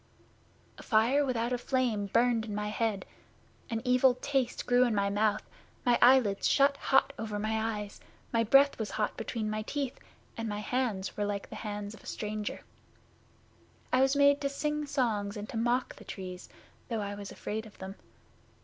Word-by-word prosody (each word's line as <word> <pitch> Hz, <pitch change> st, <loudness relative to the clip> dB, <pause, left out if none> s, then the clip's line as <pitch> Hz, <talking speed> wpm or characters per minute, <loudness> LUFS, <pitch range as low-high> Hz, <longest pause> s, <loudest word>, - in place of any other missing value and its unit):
'A -, -, -8 dB
fire 235 Hz, +6 st, +3 dB
without 245 Hz, -2 st, -1 dB
a 245 Hz, -, -1 dB
flame 240 Hz, -6 st, 0 dB
burned 235 Hz, +2 st, +2 dB
in 210 Hz, -2 st, -5 dB
my 210 Hz, 0 st, -2 dB
head; 210 Hz, -3 st, -1 dB, 0.6 s
an 225 Hz, 0 st, -2 dB
evil 250 Hz, 0 st, +4 dB
taste 260 Hz, -1 st, -1 dB
grew 245 Hz, 0 st, +4 dB
in 240 Hz, -3 st, +1 dB
my 200 Hz, 0 st, +1 dB
mouth; 210 Hz, +1 st, +1 dB, 0.4 s
my 245 Hz, -1 st, +4 dB
eyelids 240 Hz, -5 st, +5 dB
shut 280 Hz, 0 st, +4 dB
hot 270 Hz, -1 st, +3 dB
over 215 Hz, -2 st, -3 dB
my 220 Hz, +1 st, -1 dB
eyes; 205 Hz, 0 st, -8 dB, 0.3 s
my 230 Hz, 0 st, +3 dB
breath 275 Hz, +5 st, +5 dB
was 220 Hz, -, -2 dB
hot 210 Hz, -1 st, -1 dB
between 225 Hz, -1 st, -3 dB
my 215 Hz, 0 st, -2 dB
teeth, 275 Hz, +3 st, -3 dB, 0.4 s
and 230 Hz, -1 st, -3 dB
my 205 Hz, -, -3 dB
hands 210 Hz, -3 st, -2 dB
were 205 Hz, -, -1 dB
like 205 Hz, -1 st, -4 dB
the -, -, -6 dB
hands 205 Hz, -1 st, -5 dB
of 215 Hz, -, -13 dB
a -, -, -14 dB
stranger. 210 Hz, 0 st, -4 dB, 1.3 s
I 255 Hz, -, +5 dB
was 270 Hz, +1 st, +3 dB
made 285 Hz, 0 st, +5 dB
to 280 Hz, -, 0 dB
sing 300 Hz, +1 st, -2 dB
songs 220 Hz, -7 st, -1 dB
and 205 Hz, +1 st, -6 dB
to -, -, -4 dB
mock 240 Hz, +3 st, 0 dB
the -, -, -12 dB
Trees, 185 Hz, -2 st, -8 dB, 0.4 s
though 225 Hz, -3 st, -1 dB
I 200 Hz, 0 st, -3 dB
was 200 Hz, 0 st, -7 dB
afraid 220 Hz, +1 st, -5 dB
of 210 Hz, -, -17 dB
them. 190 Hz, 0 st, -7 dB
225 Hz, 185 wpm, -30 LUFS, 210-255 Hz, 1.3 s, eyelids